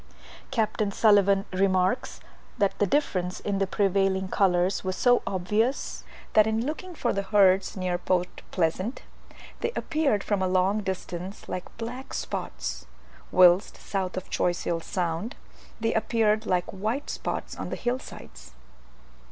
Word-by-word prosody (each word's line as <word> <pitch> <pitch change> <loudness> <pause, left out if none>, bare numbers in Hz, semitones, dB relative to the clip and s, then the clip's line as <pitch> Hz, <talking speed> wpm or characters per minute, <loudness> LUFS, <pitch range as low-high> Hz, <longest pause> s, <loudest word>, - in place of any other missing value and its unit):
Capt. 220 -4 0 0.2
Sulivan 200 -2 +4
remarks, 185 +4 +1 0.4
that 200 -1 +2
the 205 - +3
difference 185 -8 0
in 200 -1 -2
the 195 - +1
prevailing 195 -1 +1
colours 185 -1 +2
was 185 -1 -2
so 245 +3 +4
obvious, 210 +8 -1 0.3
that 215 0 +6
in 220 +2 0
looking 345 +5 -5
for 240 - 0
the 200 - 0
herds 195 -1 +3
near 180 -1 -1
Port 180 0 -1
Pleasant, 185 +7 -1 0.6
they - - -1
appeared 305 -10 +1
from 205 -2 0
a 185 - +2
long 185 +3 +2
distance 190 0 -5
like 180 - -6
black 245 +4 -6
spots, - - -4 0.4
whilst 180 +2 +5
south 190 -2 -3
of 185 - -4
Choiseul 175 -1 0
Sound 175 - -3 0.4
they 225 0 0
appeared 220 -1 +1
like 180 -1 +1
white 220 +9 -2
spots - - -4
on - - -5
the - - -3
hill 245 +1 -1
sides. 60 - -12
195 Hz, 140 wpm, -27 LUFS, 185-220 Hz, 0.6 s, that